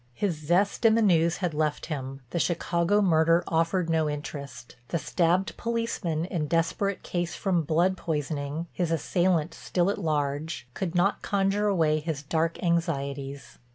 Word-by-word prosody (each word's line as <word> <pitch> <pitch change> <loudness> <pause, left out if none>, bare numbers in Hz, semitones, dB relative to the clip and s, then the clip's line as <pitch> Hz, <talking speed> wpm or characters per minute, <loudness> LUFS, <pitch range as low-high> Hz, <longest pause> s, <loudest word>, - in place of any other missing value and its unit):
His 200 -5 0
zest 175 +9 +1
in 225 -1 +6
the 230 - +3
news 170 -4 +3
had 170 - -1
left 150 0 -1
him—the 135 0 -5
Chicago 175 +4 +1
murder 165 -1 +4
offered 165 +2 +1
no 160 -2 +1
interest, 140 -4 -7
the 170 - -1
stabbed 175 +3 +1
policeman 230 -9 -2
in 170 -5 -2
desperate 170 +5 0
case 175 -1 -2
from 185 -4 +1
blood 170 +5 +2
poisoning, 150 -1 -3
his 175 -3 -1
assailant 170 +1 +1
still 180 +2 0
at - - -4
large, 150 -2 -2
could 180 +3 -3
not 190 +3 +2
conjure 200 +1 +1
away 160 -6 +2
his 150 -2 -4
dark 165 +3 0
anxieties. 140 -5 -2
165 Hz, 150 wpm, -27 LUFS, 150-180 Hz, -, in